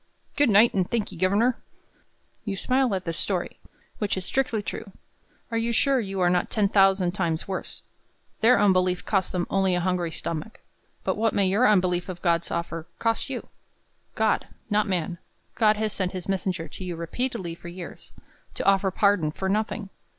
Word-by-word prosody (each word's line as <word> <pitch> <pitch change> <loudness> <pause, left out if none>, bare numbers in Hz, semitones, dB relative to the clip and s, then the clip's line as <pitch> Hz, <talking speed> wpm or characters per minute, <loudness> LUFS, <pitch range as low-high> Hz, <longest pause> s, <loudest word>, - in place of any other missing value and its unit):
"Good 290 -3 +4
night, 215 +3 +6
and 185 -2 0
thank'ee, 225 -3 -2
governor!" 200 +8 +2 0.8
You 200 -3 -3
smile 255 -1 +1
at 185 - -3
the 165 - -3
story, 180 +2 -2 0.4
which 205 -3 0
is 185 - -3
strictly 235 -4 0
true. 195 -1 -6 0.6
Are 230 - +1
you 230 +1 0
sure 270 +3 +3
you 195 -4 -3
are 175 - +4
not 180 -1 +1
ten 205 -3 +2
thousand 195 -2 +4
times 170 -4 -1
worse? 190 -1 -5 0.6
Their 240 +2 +5
unbelief 185 -3 +2
cost 195 -3 0
them 175 -1 -1
only 190 -2 +2
a - - +1
hungry 180 -1 0
stomach; 165 +8 -5 0.4
but - - -1
what 225 +1 +1
may 200 -2 +3
your 210 +7 +4
unbelief 180 -3 +2
of 175 -2 -7
God's 170 -2 +1
offer 165 -1 -4
cost 230 +3 0
you? 260 -3 -5 0.7
God - - +1 0.2
not 210 +1 +2
man 175 -2 -2 0.3
God 215 -2 +3
has 215 -1 -1
sent 185 -1 -2
his 185 -1 -6
messenger 185 -3 -1
to - - -9
you 180 -2 -4
repeatedly 180 +2 -3
for 170 - -11
years, 175 0 -9 0.4
to - - -3
offer 195 0 +4
pardon 190 -5 +2
for 190 +4 -3
nothing! 210 0 -1
195 Hz, 180 wpm, -26 LUFS, 180-215 Hz, 0.8 s, night